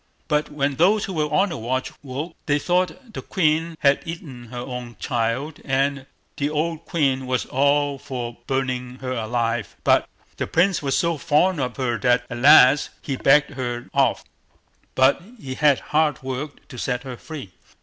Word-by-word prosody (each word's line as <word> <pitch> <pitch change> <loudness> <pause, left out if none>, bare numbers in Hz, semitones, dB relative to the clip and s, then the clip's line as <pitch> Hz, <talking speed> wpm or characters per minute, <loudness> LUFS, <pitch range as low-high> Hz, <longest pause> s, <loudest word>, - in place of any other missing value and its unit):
But 150 -1 0
when 140 -2 -1
those 200 +5 +4
who 190 - -5
were 155 -2 -1
on 190 +6 +3
the 165 - -4
watch 130 +3 -2
woke, 140 +4 -6
they 145 -1 +3
thought 185 - -1
the - - -5
queen 165 -2 0
had 140 -1 +4
eaten 150 -7 -8
her 120 +1 -9
own 120 -1 -6
child, 125 +5 -2
and 135 0 0 0.3
the 145 +1 0
old 160 +2 -2
queen 135 -6 0
was 130 0 0
all 140 +1 +1
for 125 -4 -5
burning 130 -2 -2
her 130 0 -5
alive, 115 -1 -2
but - - +3 0.3
the - - -2
Prince 180 +2 +2
was 135 -2 0
so 170 -3 0
fond 170 +2 +2
of 125 -2 -2
her 120 -4 -1
that 125 +2 +3
at 120 - -4
last 135 +1 +7
he 140 - -2
begged 145 +3 +4
her 120 -3 -4
off, 135 -3 +2 0.7
but 130 +5 +4 0.2
he 130 -6 -6
had 145 0 +3
hard 150 -2 +2
work 135 +3 -6
to 125 - -8
set 125 0 -2
her 130 -2 -6
free. 135 - -9
140 Hz, 175 wpm, -23 LUFS, 125-155 Hz, 0.7 s, last